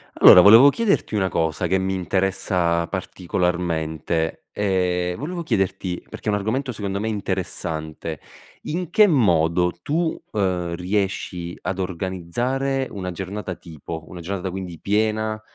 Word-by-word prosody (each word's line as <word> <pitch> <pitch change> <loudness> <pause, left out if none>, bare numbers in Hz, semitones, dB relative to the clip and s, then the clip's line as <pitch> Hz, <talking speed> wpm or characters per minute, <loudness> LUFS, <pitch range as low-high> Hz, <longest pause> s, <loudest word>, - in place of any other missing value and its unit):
Allora 90 - +9
volevo 115 +8 +9
chiederti 205 - 0
una 95 -2 +1
cosa, 80 +1 0
che 95 - +2
mi 95 0 -1
interessa 90 -2 0
particolarmente. 85 -3 -2
Ehm, 90 -3 0
volevo 170 +4 -4
chiederti 95 - -1
perché - - -9
è - - +3
un - - +2
argomento 125 +6 -2
secondo 100 -2 -3
me 110 - -2
interessante: 85 -6 -3 0.4
in 175 +1 -3
che 210 +3 +6
modo 90 - +3
tu, 160 - -1
uhm, 90 -4 -1
riesci 90 -2 -2
ad 95 0 -3
organizzare 95 +10 -2
una 95 -2 -4
giornata 95 +1 -5
tipo? 80 -1 -8
Una 90 - -9
giornata 95 +2 -4
quindi 90 -2 -6
piena, 110 +1 0
95 Hz, 130 wpm, -22 LUFS, 90-110 Hz, 0.4 s, Allora